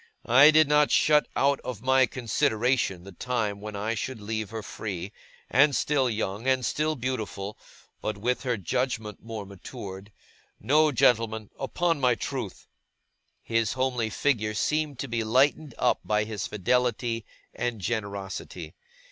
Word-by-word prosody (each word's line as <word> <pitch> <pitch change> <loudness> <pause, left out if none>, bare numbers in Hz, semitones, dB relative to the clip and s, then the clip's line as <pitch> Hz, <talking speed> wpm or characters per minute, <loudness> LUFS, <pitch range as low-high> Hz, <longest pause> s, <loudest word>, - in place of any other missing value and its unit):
I 135 +5 +8
did 155 -1 +6
not 150 0 +4
shut 150 -1 +4
out 140 0 +2
of 125 -4 -7
my 130 0 +4
consideration 115 -4 0
the 100 - -10
time 105 -1 -2
when 105 0 -6
I 105 +3 -1
should 125 +2 -4
leave 110 0 -3
her 110 0 -6
free, 100 -4 -5 0.4
and 140 +3 +4
still 135 0 +2
young 110 +1 -3
and 130 -2 +2
still 155 +8 0
beautiful, 110 -6 -4 0.5
but 110 -1 -3
with 125 +5 -1
her 125 -3 -1
judgement 110 +2 -2
more 110 -2 -6
matured 95 +1 -9 0.5
no, 150 +7 +4
gentlemen 110 -4 +2
upon 165 +4 0
my 125 -3 +3
truth!' 120 -5 -5 0.8
His 115 -2 0
homely 130 -3 0
figure 110 -3 0
seemed 150 +3 0
to 140 - -4
be 115 -2 -1
lightened 135 +5 +2
up - - +2
by 105 0 +1
his 105 -2 -4
fidelity 115 +2 0 0.3
and 120 -2 -2
generosity. 100 -5 -4
115 Hz, 145 wpm, -27 LUFS, 105-130 Hz, 0.8 s, I